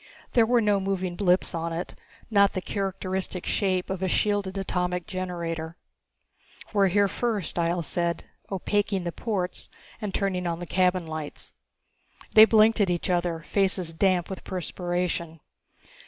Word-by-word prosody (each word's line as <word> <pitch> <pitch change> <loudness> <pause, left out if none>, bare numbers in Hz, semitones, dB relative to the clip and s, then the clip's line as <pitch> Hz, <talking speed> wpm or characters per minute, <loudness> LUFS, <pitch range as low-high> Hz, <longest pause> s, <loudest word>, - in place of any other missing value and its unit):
There 230 -2 +5
were 240 0 +4
no 205 -2 +3
moving 190 -2 -2
blips 185 -1 +2
on 165 0 -2
it, 165 +2 -4 0.4
not 200 -1 +5
the 185 - -1
characteristic 190 -2 -3
shape 185 -3 0
of 190 -1 -3
a 190 - +1
shielded 200 0 0
atomic 180 -2 -1
generator. 170 -3 -4 1.0
"We're 200 -2 +4
here 200 +2 +3
first," 215 -2 -2
Ihjel 170 0 0
said, 170 +2 -1 0.3
opaqueing 200 0 0
the 170 - -2
ports 190 -3 -3 0.3
and 210 -2 -3
turning 185 -2 -1
on 170 -1 -1
the 175 - -6
cabin 180 0 +2
lights. 155 -2 -7 0.8
They 220 0 +10
blinked 220 0 +5
at 195 - +3
each 175 +1 0
other, 175 -2 0
faces 185 0 0
damp 180 0 +2
with 190 - -7
perspiration. 175 -2 -3
185 Hz, 145 wpm, -26 LUFS, 175-200 Hz, 1.0 s, They